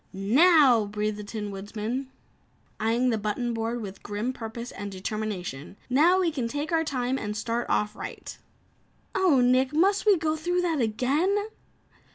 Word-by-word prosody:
"Now!" 250 - +5
breathed 210 +1 -2
the 210 - -6
Tin 210 0 -5
Woodman 215 +6 -4 0.7
eyeing 235 +3 +2
the 220 - 0
button 225 +3 -2
board 230 +1 -2
with 195 -1 -8
grim 210 +5 -3
purpose 235 0 -7
and 205 0 -6
determination, 190 -6 -5
"Now 335 +8 +5
we 350 -3 +2
can 260 -6 -2
take 290 +6 -4
our 325 -1 +2
time 260 -3 -1
and 210 0 -4
start 230 +2 -2
off 210 0 0
right." - - -7 0.8
"Oh, 330 -9 +4
Nick! 255 +2 +3
Must 390 +6 +2
we 405 -3 +6
go 315 -1 0
through 345 +3 -2
all 335 -2 +1
that 280 - 0
again?" 295 - +1
240 Hz, 165 wpm, -26 LUFS, 210-305 Hz, 0.8 s, we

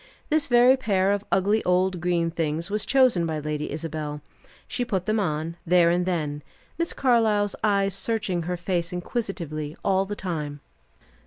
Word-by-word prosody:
This 310 0 +2
very 245 0 +6
pair 195 -6 +1
of 205 0 0
ugly 205 +3 +2
old 180 0 +1
green 170 -1 +1
things 165 +2 -2
was 210 0 -1
chosen 250 -11 +4
by 160 -1 -2
Lady 150 0 -3
Isabel. 150 -1 -5 0.4
She 250 - -2
put 195 -7 -2
them 215 +1 +1
on, 160 -2 -2
there 175 -1 +4
and 180 +1 0
then, 150 -5 -2 0.4
Miss 335 - 0
Carlyle's 220 -5 +2
eyes 200 -2 +2
searching 195 -3 -1
her 180 +2 -3
face 175 0 -2
inquisitively 175 - -4
all 195 -1 +2
the 205 +1 -5
time. 150 -7 -4
180 Hz, 160 wpm, -25 LUFS, 165-205 Hz, 0.4 s, very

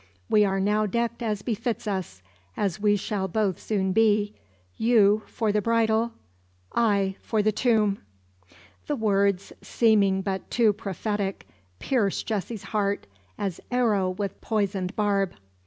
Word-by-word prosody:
We 210 - +6
are 195 -1 +1
now 210 +2 +2
decked 235 +3 -2
as 210 -3 -2
befits 230 0 -2
us 185 - -4 0.3
as 200 -1 -1
we 205 -1 +4
shall 200 -1 -2
both 200 -1 0
soon 190 -3 0
be 210 0 +3 0.4
you 215 -2 +4
for 220 -3 -1
the 210 0 +1
bridal, 230 +1 +1 0.6
I 200 -4 +2
for 215 -2 0
the 215 - +3
tomb!" 215 -3 +2 0.9
The 295 - 0
words, 200 -4 +1
seeming 200 -4 +3
but 190 -1 -3
too 225 -3 +3
prophetic, 200 -1 -3 0.3
pierce 210 - 0
Jessie's 215 0 -3
heart 205 -2 -1 0.3
as 195 -4 -3
arrow 220 -7 +2
with 195 +1 -4
poisoned 200 -3 -1
barb. 200 -3 +1
210 Hz, 135 wpm, -26 LUFS, 195-220 Hz, 0.9 s, We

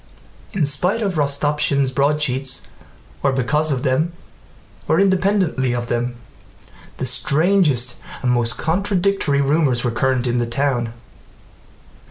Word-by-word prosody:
In 175 -6 +1
spite 180 +10 0
of 195 -2 -1
Rostopchín's 140 -2 +1
broadsheets, 135 -1 0 0.6
or 140 - +2
because 150 +4 0
of 130 -1 -1
them 150 +5 0 0.7
or - - +2
independently 190 -9 +1
of 120 -1 -4
them, 120 +1 -1 0.8
the - - -3
strangest 140 0 +2 0.3
and 125 - +2
most 120 -2 0
contradictory 185 -4 +1
rumors 140 -4 +1
were 120 - 0
current 130 +1 0
in 120 0 0
the 120 - -1
town. 120 -2 -1
140 Hz, 120 wpm, -20 LUFS, 125-160 Hz, 0.8 s, or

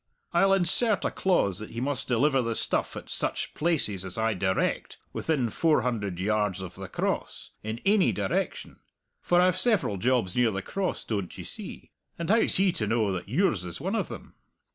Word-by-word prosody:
I'll 195 +3 +4
insert 195 +4 +3
a - - 0
clause 135 - +1
that 110 - -6
he 115 - -6
must 140 +2 -1
deliver 135 +3 +2
the 115 -1 -2
stuff - - +1
at - - -8
such - - -2
places 145 - +1
as 95 +1 -7
I 110 0 +1
direct 95 0 -1 0.2
within 135 -8 -1
four 160 -2 +2
hundred 105 -8 -2
yards 105 -1 0
of 95 -1 -7
the 95 0 -8
Cross, - - -3
in 110 +2 -5
ainy 200 -1 +4
direction 100 -2 -3 0.4
for 175 - +3
I've 185 0 +3
several 205 - +2
jobs 115 -3 +1
near 125 -2 +3
the 95 -3 -4
Cross, 195 -2 -3
doan't 100 -5 -4
ye - - -7
see, - - -9 0.3
and 170 +3 -1
how's 225 +1 +4
he 190 0 +3
to 105 -10 -3
know 110 -2 +1
that 90 +1 -5
yours 130 - +1
is 90 -2 -7
one 190 +6 -2
o' - - +2
them? - - -9
115 Hz, 190 wpm, -27 LUFS, -, 0.4 s, I'll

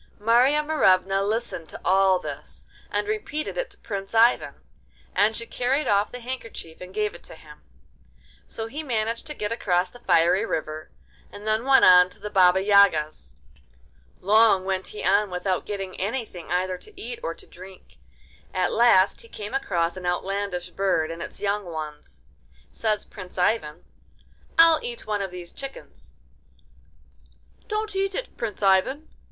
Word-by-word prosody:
Marya 245 +7 +3
Morevna 195 -10 +3
listened 210 -5 -2
to - - -9
all 190 0 +4
this, - - -7 0.2
and - - -2
repeated 420 -8 -3
it - - -3
to - - -18
Prince 200 0 -6
Ivan, 230 +2 +4 0.6
and 215 +2 +3
she 230 - -5
carried 260 +6 -1
off 200 0 +2
the 250 - -8
handkerchief 230 -10 -7
and 180 0 -9
gave 210 +1 -1
it - - -12
to - - -8
him. - - -15 0.9
So 225 - -5
he 280 +7 -5
managed 230 -5 -2
to 300 - -6
get 210 -3 -3
across 180 -5 0
the 245 - -14
fiery 175 -1 +3
river, 155 -6 -4 0.4
and 205 +1 -11
then 215 +2 0
went 270 0 +6
on 180 0 +8
to - - -17
the 210 - -7
Baba 190 -1 +5
Yaga's. 155 - +3 0.8
Long 210 -1 +4
went 190 -1 -2
he 210 - -8
on 200 +1 +3
without 185 +1 -2
getting 195 -2 -5
anything 205 -5 -4
either 185 0 -1
to 415 -3 -14
eat 460 +3 -6
or - - -4
to 395 - -14
drink. 185 - -14 0.6
At 185 -1 +1
last 210 -5 +4
he 460 - -15
came 210 - -8
across 175 -10 0
an 180 -1 -5
outlandish 180 0 -2
bird 175 -5 0
and 165 0 -7
its - - -8
young 205 0 0
ones. 155 -3 -8 0.5
Says 215 -2 -1
Prince 185 -3 -11
Ivan: 180 -5 0 0.7
'I'll 330 -1 +7
eat 475 0 -6
one 210 -1 -1
of 195 - -3
these 180 -1 -9
chickens.' 275 0 -10 1.5
'Don't 425 -2 -3
eat 390 0 -1
it, - - -5
Prince 215 -3 -5
Ivan! 195 +11 +2
205 Hz, 160 wpm, -25 LUFS, 185-240 Hz, 1.5 s, on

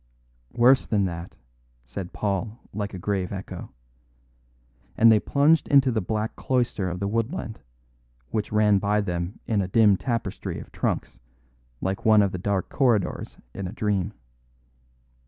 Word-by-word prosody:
"Worse 125 +2 +5
than 105 -3 +2
that," 85 -1 -6 0.5
said 85 +9 -6
Paul 105 +2 -2 0.2
like 100 -1 -4
a - - -5
grave 95 0 -2
echo. 95 -1 -6 1.3
And 115 0 +7
they 110 - +6
plunged 145 +7 +3
into 135 -2 +5
the 110 -2 0
black 110 +3 -2
cloister 120 -7 0
of 90 +1 -4
the 100 - -1
woodland, 115 - -2 0.7
which 105 -1 -2
ran 105 -2 +4
by 105 +1 +1
them 90 0 -3
in 105 -3 +1
a 95 - -2
dim 105 0 +5
tapestry 120 -1 -3
of - - -11
trunks, - - -2 0.6
like 95 +1 -2
one 110 -2 +6
of 100 - 0
the 90 - -4
dark 95 0 -1
corridors 120 -8 0 0.2
in 100 -2 -4
a - - -6
dream. 105 -4 -1
105 Hz, 150 wpm, -25 LUFS, 95-115 Hz, 1.3 s, And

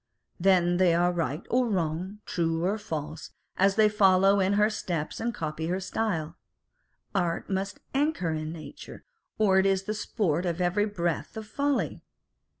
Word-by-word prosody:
Then 175 -1 +4
they 180 -2 +4
are 175 +1 +3
right 165 -3 -2
or 250 0 +3
wrong, 185 +2 -2
true 165 0 -1
or 205 +4 0
false, 155 -5 -5 0.3
as 195 +1 +3
they 215 0 +6
follow 195 -1 +4
in 190 +1 +2
her 210 +1 +4
steps 170 -7 -3
and 235 +1 -1
copy 160 -5 -4
her 180 +2 -1
style. 180 -5 -2 0.8
Art 175 0 -1
must 190 0 -2
anchor 275 - +1
in 155 0 -3
nature, 160 -2 -10 0.3
or 195 -3 +4
it 190 - +3
is 195 -1 +1
the 210 - -2
sport 205 -6 -1
of 170 0 -2
every 180 +4 +1
breath 175 -2 -2
of 220 - -5
folly. 280 +5 -1
185 Hz, 160 wpm, -28 LUFS, 165-205 Hz, 0.8 s, they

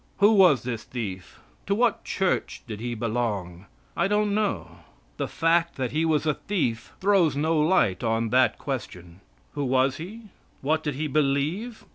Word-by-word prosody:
Who 205 +2 +6
was 185 - +5
this 120 -3 -4
thief? 100 -7 -6 0.3
To 200 - +2
what 235 0 +1
church 190 -2 -1
did 110 -3 -7
he 120 +1 -3
belong? 105 -6 -3 0.3
I - - +2
don't 210 0 +1
know. 90 - -2 0.4
The - - -2
fact 170 +1 +1
that 130 -3 -2
he 160 +2 +1
was 160 -1 +1
a 150 - +2
thief 130 - -2
throws 185 -7 +3
no 155 +2 +1
light 150 - +2
on 115 0 0
that 130 +2 +3
question. 90 -10 -6 0.3
Who 145 - -2
was 130 0 +2
he? 210 +7 -9 0.3
What 155 +3 +1
did 150 -3 -3
he 155 +3 -2
believe? 155 - -1
145 Hz, 165 wpm, -25 LUFS, 115-180 Hz, 0.4 s, Who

